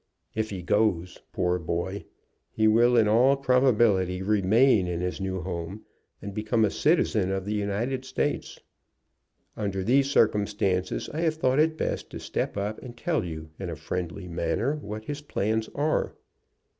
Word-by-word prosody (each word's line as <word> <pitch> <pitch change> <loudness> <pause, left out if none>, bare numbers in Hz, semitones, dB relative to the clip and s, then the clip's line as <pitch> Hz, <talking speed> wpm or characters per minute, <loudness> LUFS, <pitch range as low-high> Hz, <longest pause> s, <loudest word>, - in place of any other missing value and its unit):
If 110 0 -2
he 95 -3 -6
goes, 90 -2 +1
poor 90 0 0
boy! 85 +4 -3 0.4
he 110 0 +1
will 120 +3 +5
in 110 -2 +5
all 125 +6 +4
probability 115 -9 +3
remain 105 +1 +3
in 85 -1 -2
his 90 +2 -3
new 95 -1 -2
home 90 +3 -5 0.4
and 100 - -6
become 110 +2 +1
a 105 - 0
citizen 110 - +2
of 95 -1 -2
the 105 - -2
United 105 +6 -1
States. 130 - -2 1.0
Under 100 -3 -2
these 135 +6 +3
circumstances 100 -6 +1
I 155 - -3
have 160 -2 +1
thought 130 -3 +1
it 160 +1 +3
best - - -3
to - - -7
step - - -3
up 105 +2 -3
and 120 -2 -10
tell 160 -1 0
you 80 -2 -7
in 95 -2 -4
a 85 - -4
friendly 85 +3 -5
manner 110 - -1
what 110 -5 -7
his 145 +3 -5
plans 110 -5 -1
are." 150 +2 0
105 Hz, 160 wpm, -27 LUFS, 95-125 Hz, 1.0 s, will